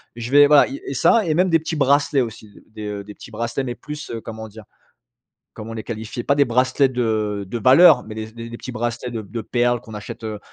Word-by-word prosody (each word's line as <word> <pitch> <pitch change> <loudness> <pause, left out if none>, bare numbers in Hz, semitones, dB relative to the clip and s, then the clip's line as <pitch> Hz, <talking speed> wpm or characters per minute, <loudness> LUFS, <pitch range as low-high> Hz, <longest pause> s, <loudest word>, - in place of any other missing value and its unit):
Je 120 +1 -6
vais, 145 0 +7
voilà, 150 0 +6
i 275 - -6
et - - -3
ça 225 -3 +3
et 160 - +1
même 180 +4 +2
des 165 -1 +4
petits 160 +1 -4
bracelets, 145 -1 +2
aussi. 110 -3 -6 0.2
Des, 105 -1 -6
heu 100 -1 -5
des 105 +1 -11
petits 110 - -13
bracelets, 120 +4 -3
mais 120 -1 -4
plus, 150 +3 -8
heu, 115 -1 -5
comment 110 0 -8
dire? 110 +1 -13 0.9
Comment 110 +1 -8
les 110 -1 -6
qualifier? 110 +1 -6
Pas 140 - +2
des 140 0 +4
bracelets 130 +3 +2
de 110 -5 -1
de 110 +6 -5
valeur, 135 - +7
mais 110 - -9
des 110 - -4
s 110 0 -11
des 115 0 -8
des 120 - -8
petits 130 - -8
bracelets 120 +1 -3
de 115 -2 -4
p 100 - -17
de 115 - -3
perles 120 +1 0
qu'on 110 - -12
achète, 105 +2 -8
heu 110 -2 -5
120 Hz, 255 wpm, -21 LUFS, 110-140 Hz, 0.9 s, vais